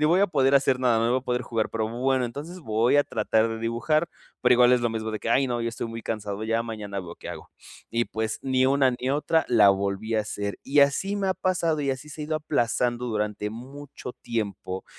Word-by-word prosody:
ni - - +5
voy 170 +5 +4
a 200 - +5
poder 135 -6 +2
hacer 135 -2 +3
nada. 120 -3 +3
No 115 +1 +1
voy 130 - +3
a - - -25
poder 125 -1 -1
jugar, 115 -3 -2
pero 110 -1 -1
bueno, 130 +2 0
entonces 150 +9 -7
voy 115 0 +2
a 145 - +4
tratar 110 +1 +1
de 115 0 -4
dibujar, 120 +9 0 0.3
pero, 125 0 +5
igual 125 0 +6
es 125 - +4
lo 120 -1 0
mismo 110 -1 -3
de 110 - -3
que - - -5
¡ay 135 +3 +3
no! 120 -1 -2
Ya 115 - -1
estoy 115 0 -4
muy 115 0 -7
cansado. 105 -1 -4
Ya 115 +1 0
mañana 105 -4 -5
veo 85 -2 -9
qué - - -10
hago, - - -10 0.4
y 115 0 +1
pues, 110 0 -3
ni 130 -1 +2
una 135 -1 +4
ni 130 - -1
otra 150 +3 +1
la 105 -5 +6
volví 100 +3 -1
a 110 - +3
hacer, 100 -1 -4
y 145 +2 +3
así 140 +9 +2
me 195 -2 +1
pasado 165 -4 0
y 140 -1 0
así 135 +3 -5
se 150 - -9
ha - - -3
ido 155 +1 -1
aplazando 120 -4 0
durante 105 -2 -2
mucho 130 +2 -9
tiempo, 100 -4 -4
120 Hz, 240 wpm, -26 LUFS, 110-140 Hz, 0.4 s, igual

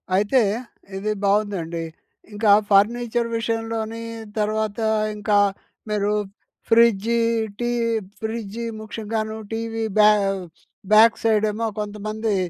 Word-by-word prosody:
అయితే 210 +7 +3 0.6
ఇది 215 +2 -2
బావుందండి. 195 -5 0 0.5
ఇంకా 205 0 +3 0.2
ఫర్నిచర్ 235 +3 +3
విషయంలోని 225 0 -3 0.4
తర్వాత 215 0 -1 0.4
ఇంకా 205 0 +2 0.5
మీరు 210 -1 0 0.6
ఫ్రిడ్జి, 230 0 +4 0.4
టీ 240 0 -1 0.5
ఫ్రిడ్జ్, 220 -1 -4 0.2
ముఖ్యంగాను 220 0 -4 0.2
టీవీ 225 0 -3
బ్యా 210 0 +8 0.8
బ్యాక్ 225 +1 +7
సైడేమో 215 0 +1
కొంతమంది 210 +1 -3
215 Hz, 85 wpm, -22 LUFS, 210-225 Hz, 0.8 s, బ్యా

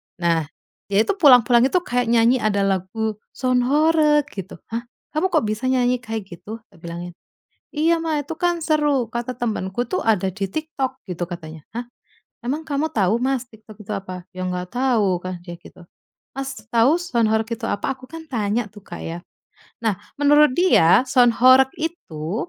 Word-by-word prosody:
nah, 165 -3 0 0.4
dia 200 +2 +3
itu 400 - 0
pulang-pulang 245 - +6
itu 365 - +2
kayak 245 -4 0
nyanyi 235 +2 +4
ada 200 -3 +1
lagu, 195 +3 -1 0.2
"Sound 255 -1 +1
horeg" 300 +1 +4
gitu. 195 -1 -7 0.2
"Hah, 235 +1 -4 0.2
kamu 310 +5 +1
kok - - +3
bisa 215 +3 -2
nyanyi 250 -1 +2
kayak 225 -3 -5
gitu?" 215 +6 -9
Tak - - -20
bilangin. 170 +1 -7 0.6
"Iya 325 +3 +2
Mah, 315 -2 0
itu 290 +3 -6
kan 350 0 0
seru 295 -6 +1
kata 240 +2 -4
temanku 225 -1 -2
tuh, 370 - -2
ada 205 -4 +2
di 195 +2 -4
TikTok 305 0 -3
gitu," 175 -1 -3
katanya. 160 -3 -9
"Hah, 240 +1 -5 0.6
emang 290 +6 -2
kamu 305 0 -1
tau 205 +1 +2
Mas, 260 0 0
TikTok 215 -1 -15
itu 210 - -8
apa?", 185 -3 -5
"Ya 185 0 -4
nggak 180 0 -4
tau," 220 -8 +2
kan, 185 -1 -6
dia 175 -2 -7
gitu. 180 - -15 0.5
"Mas, 270 0 -4 0.2
tau 240 +7 +4
sound 235 -11 +1
horeg 220 0 +1
itu 230 +1 -9
apa?" 235 +6 -1
Aku 260 - -15
kan 325 0 -9
tanya 220 -2 -1
tuh 205 0 -15
Kak, 175 - -8
ya. 165 +1 -5 0.6
Nah, 215 -4 0 0.2
menurut 295 -1 +5
dia 225 - +5
sound 245 -2 +4
horeg 260 +1 +7
itu 220 - -4
235 Hz, 175 wpm, -22 LUFS, 195-270 Hz, 0.6 s, horeg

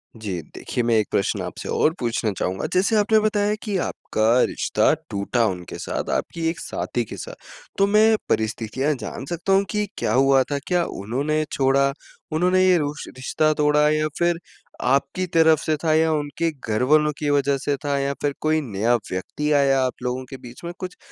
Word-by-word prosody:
जी। 100 -6 -4
देखिए 120 - -3
मैं 115 -1 +2
एक 110 - +1
प्रश्न 100 - 0
आपसे - - -6
और 155 - +2
पूछना 115 -2 -1
चाहूँगा। 95 +1 -2
जैसे 195 +5 +2
आपने 215 +1 +4
बताया 210 -1 +1
कि 210 -3 -3
आपका 110 0 -2 0.2
रिश्ता - - +1 0.2
टूटा 100 +4 0
उनके 90 -3 -5
साथ, - - -4
आपकी 165 -1 -2
एक 165 - -4
साथी - - -3
के - - -9
साथ। - - -7 0.4
तो 195 - +4
मैं 215 +2 +5
परिस्थितियाँ 110 +6 0
जान 125 - -6
सकता 175 +3 -1
हूँ 195 +1 +4
कि 210 -1 0
क्या 105 - 0
हुआ 135 +1 +4
था? 145 - 0
क्या 175 -2 +2
उन्होंने 140 +10 -2
छोड़ा? 140 0 +2 0.4
उन्होंने 180 +4 +3
ये 185 -1 +5
रुश 145 -2 -3
रिश्ता 140 +4 +1
तोड़ा 150 0 +3
या 155 0 +1
फिर 170 -1 +2 0.4
आपकी 140 +7 +1
तरफ़ 160 -2 +5
से 155 - +2
था? 160 -1 +3
या 160 +1 +3
उनके 150 +2 -1
घरवालों 140 +4 +2
की 150 - -1
वज़ह 140 -1 +2
से 145 - +1
था? 140 -1 +1
या 140 0 -1
फिर 145 -1 0
कोई 155 0 +2
नया 110 +5 +2 0.2
व्यक्ति 150 +11 -3
आया 140 -2 +4
आप 125 - -2
लोगों 125 +1 -2
के 135 - -7
बीच 125 +2 -12
में? 170 0 -5
कुछ 180 -1 -6
145 Hz, 190 wpm, -23 LUFS, 125-170 Hz, 0.4 s, मैं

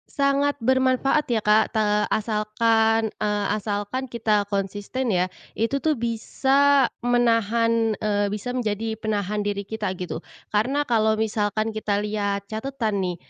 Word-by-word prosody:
Sangat 280 0 +2
bermanfaat 260 +3 +2
ya 225 -3 0
Kak, 215 +1 +3
te 215 - +3 0.2
asalkan, 220 +1 +1
eee, 210 -1 0
asalkan 205 +6 -3
kita 215 -4 0
konsisten 205 +5 -2
ya. 180 0 +2 0.2
Itu 230 +5 -1
tuh 305 -6 +1
bisa 265 +4 +2 0.2
menahan, 230 -1 +2
eee, 205 -1 0
bisa 230 +5 -4
menjadi 220 -1 -2
penahan 210 -1 -2
diri 200 -1 -3
kita 215 -3 -3
gitu. 180 -2 -5 0.2
Karena 270 +8 0
kalau 220 -2 +2
misalkan 215 0 -1
kita 205 -1 0
lihat 200 -1 -2
catatan 220 -4 -2
nih, 180 -1 -2
220 Hz, 130 wpm, -24 LUFS, 205-245 Hz, 0.2 s, Kak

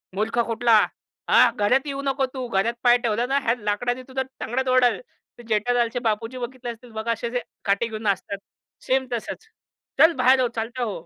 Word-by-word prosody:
"मूर्ख 220 +4 -1
कुठला. 230 -1 +4 0.4
हा - - +7
घरात 250 +7 +2
येऊ 275 -1 -3
नको. 275 -1 0
तू 260 -2 -4
घरात 230 +1 +1
पाय 245 -1 +6
ठेवला 230 +1 +1
ना, 270 +2 +1
ह्या 230 0 +2
लाकडाने 245 +4 -1
तुझा 265 0 -2 0.2
तंगड 245 +3 -1
तोडल." 255 -1 +3 0.4
तर 240 - -12
जेठालालचे 235 +2 +1
बापूजी 225 +1 -2
बघितले 250 0 -6
असतील 235 +1 -13
बघा 220 +1 -2
असे 230 +1 -2
जे 245 0 -1 0.2
काठी 200 +3 +1
घेऊन 220 -1 -7
नाचतात. 200 -1 -1 0.5
सेम 260 0 +1
तसंच. 235 - -5 0.5
"चल 325 +1 +7
बाहेर 260 +1 +5
हो, 250 - +3
चालता 235 +3 -3
हो." 200 -8 -4
240 Hz, 185 wpm, -24 LUFS, 220-255 Hz, 0.5 s, हा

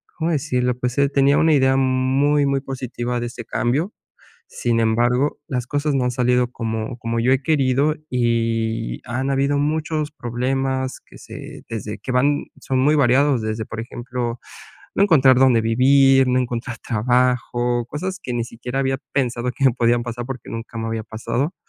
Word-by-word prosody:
¿cómo 165 +1 -1
decirlo?, 125 -5 0
pues, 125 +1 -2
eh, 140 0 +3
tenía 140 0 +3
una 160 -1 +4
idea 130 -2 +4
muy 135 +2 +2
muy 140 -1 0
positiva 125 -2 -4
de 120 - -3
este 120 0 -8
cambio, 145 - -1 0.6
sin 115 -1 0
embargo, 120 +5 +1
las 125 -3 -3
cosas 145 +2 -1
no 130 -2 +1
han 125 - +1
salido 125 0 +1
como 115 0 -4
como 115 -1 -2
yo 125 +3 +3
he 135 +1 +1
querido 140 -1 +2 0.2
y 115 - 0
han 130 +4 -2
habido 140 +1 +1
muchos 155 +1 -1
problemas 130 +1 -2
que - - -15
se - - -10
desde 105 -2 -5
que - - -7
van 145 +3 +2
son 130 - -1
muy 145 +4 +4
variados, 135 -2 +3
desde, 110 0 -3
por 110 - -8
ejemplo, 120 0 -4 0.6
no - - +2
encontrar 135 -9 +5
dónde 130 -3 +5
vivir, 135 +3 +4
no 125 0 +2
encontrar 120 -1 -4
trabajo, 120 +1 0
cosas 185 +8 -4
que 125 - -4
ni 120 - 0
siquiera 125 +3 -6
había 135 0 0 0.2
pensado 125 -2 0
que 135 - -2
me 130 - +5
podían 120 0 +2
pasar 120 0 -5
porque 130 -3 -7
nunca 115 0 -6
me 115 - -3
había 115 -1 -3
pasado 125 - -3
125 Hz, 175 wpm, -21 LUFS, 120-135 Hz, 0.6 s, encontrar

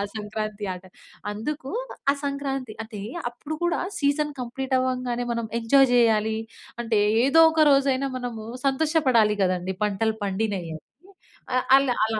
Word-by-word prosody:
సంక్రాంతి 215 0 -4
ఆట 180 - -12 0.5
అందుకు 270 +5 -5 0.4
ఆ - - -7
సంక్రాంతి 270 -4 -3
అదే 210 -3 -8 0.3
అప్పుడు 300 +6 -6
కూడా 345 - +1 0.2
సీజన్ 290 +1 +1
కంప్లీట్ 260 +2 -2
అవ్వంగానే 250 -1 -1
మనం 235 -1 -3
ఎంజాయ్ 270 +3 +5
చేయాలి. 220 -2 +3 0.4
అంటే 225 -3 +1 0.3
ఏదో 305 +4 +5
ఒక 320 0 +2
రోజైనా 275 -1 +2
మనము 240 -3 -5 0.2
సంతోష‌పడాలి 270 -7 +3
గదండీ 185 0 -1
పంటలు 215 +2 0
పండినియి 200 +2 -1 0.2
అని 155 - -10 0.7
ఆహ్, 255 - +1
ఆళ్ళు 275 -1 +3
అలా 220 0 0
245 Hz, 135 wpm, -25 LUFS, 215-275 Hz, 0.7 s, ఎంజాయ్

